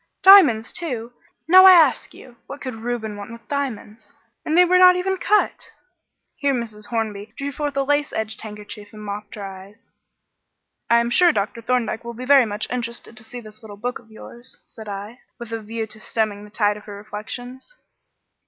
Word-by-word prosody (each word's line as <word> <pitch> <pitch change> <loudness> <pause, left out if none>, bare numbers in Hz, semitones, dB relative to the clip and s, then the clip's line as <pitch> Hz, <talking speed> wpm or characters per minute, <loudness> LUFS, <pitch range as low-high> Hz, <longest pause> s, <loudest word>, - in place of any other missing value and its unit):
Diamonds, 295 - +7
too! 245 -9 -4 0.3
Now, 370 +3 +8
I 375 - +10
ask 320 -6 +4
you, 245 -2 -15
what 275 - -8
could 255 -3 -6
Reuben 225 -2 -4
want 205 +2 -9
with 230 0 -12
diamonds? 250 -6 -5 0.3
and 315 +2 0
they 360 - +7
were 365 +1 +4
not 365 0 +8
even 380 +1 -1
cut." 420 +3 +1 0.7
Here 280 -2 +1
Mrs. 215 -3 -6
Hornby 215 -2 -4
drew 280 0 -4
forth 290 0 -4
a 275 - +2
lace 290 +1 0
edged 220 -1 -4
handkerchief 210 -1 -9
and 215 0 -10
mopped 205 +1 -7
her 205 - -7
eyes. 195 +2 -12 1.0
"I 235 - +5
am 235 0 -2
sure 350 +6 +5
Dr. 205 -2 -3
Thorndyke 230 -1 -1
will 235 0 -7
be 250 +2 -7
very 270 -3 +6
much 210 +1 -4
interested 235 -1 -5
to 220 - -8
see 240 +2 -9
this 215 +1 -14
little 210 -2 -11
book 245 +4 -4
of 235 - -22
yours," 240 +3 -11
said 220 -2 -11
I, 205 +4 -7 0.2
with 235 -2 -9
a 225 -1 -4
view 225 +1 -4
to 215 0 -8
stemming 215 -2 -2
the - - -14
tide 205 -1 0
of 210 - -14
her 205 - -9
reflections. 245 - -9
230 Hz, 195 wpm, -22 LUFS, 210-275 Hz, 1.0 s, I